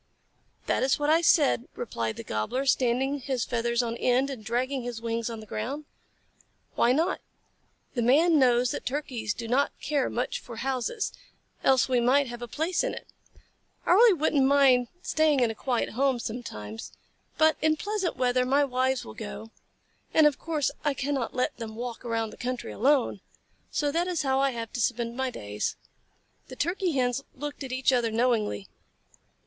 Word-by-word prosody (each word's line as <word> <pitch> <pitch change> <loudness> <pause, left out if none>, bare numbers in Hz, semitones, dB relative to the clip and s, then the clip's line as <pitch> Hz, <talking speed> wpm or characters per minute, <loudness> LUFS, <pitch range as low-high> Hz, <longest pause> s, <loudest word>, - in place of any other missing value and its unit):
"That - - +1
is 260 0 +2
what 295 +1 +1
I 325 +1 +5
said," 290 -7 +3
replied 115 - -3
the - - -7
Gobbler, 110 - -2
standing 265 +2 +2
his 255 -3 -2
feathers 235 0 0
on 230 -1 -2
end 255 +3 +2
and 245 -5 -7
dragging 255 +4 -1
his 240 -1 -5
wings 230 0 -2
on 225 -1 -6
the - - -10
ground. 255 +9 -4 0.9
"Why 235 - +3
not? 325 +7 +1 0.7
The 240 - -1
Man 305 +7 +5
knows 245 -1 +4
that - - -4
Turkeys 250 -6 -3
do 230 - -6
not 265 +5 +1
care 285 -3 0
much - - -2
for 235 - -10
houses, 265 - -2 0.5
else 260 -2 +4
we 255 -2 +2
might 270 +4 +4
have 240 -1 -8
a 240 - -5
place 320 - -1
in - - -2
it. - - -9 0.8
I - - +2
really 425 +2 +7
wouldn't 300 -3 +2
mind 270 -3 +5 0.2
staying 310 -3 +2
in 240 -3 +2
a - - -5
quiet 245 +2 -1
home 265 +1 +1
sometimes, 110 - -6 0.5
but 315 0 +5
in 310 0 +3
pleasant 410 0 -2
weather 250 0 +2
my 275 +3 +3
wives 260 0 0
will - - -9
go, 220 0 -8 0.6
and 315 - +7
of 295 -3 +3
course 305 -4 -1
I 290 -2 +1
cannot 270 -2 -2
let 250 - -1
them 220 -2 -6
walk 240 +1 -6
around 225 -2 -2
the - - -13
country 250 0 -4
alone, 260 -5 +2 0.5
so 290 -1 0
that 340 +4 0
is 350 -4 -1
how 265 -1 +1
I 275 0 +3
have 230 -3 -5
to 245 - -2
spend 235 0 -1
my 265 0 -1
days." 105 - -4 0.7
The 255 - -9
Turkey 350 +4 0
Hens 255 0 0
looked 290 +1 -6
at 265 - -6
each 260 +1 +2
other 240 -2 +2
knowingly. 220 - 0
255 Hz, 180 wpm, -27 LUFS, 235-285 Hz, 0.9 s, really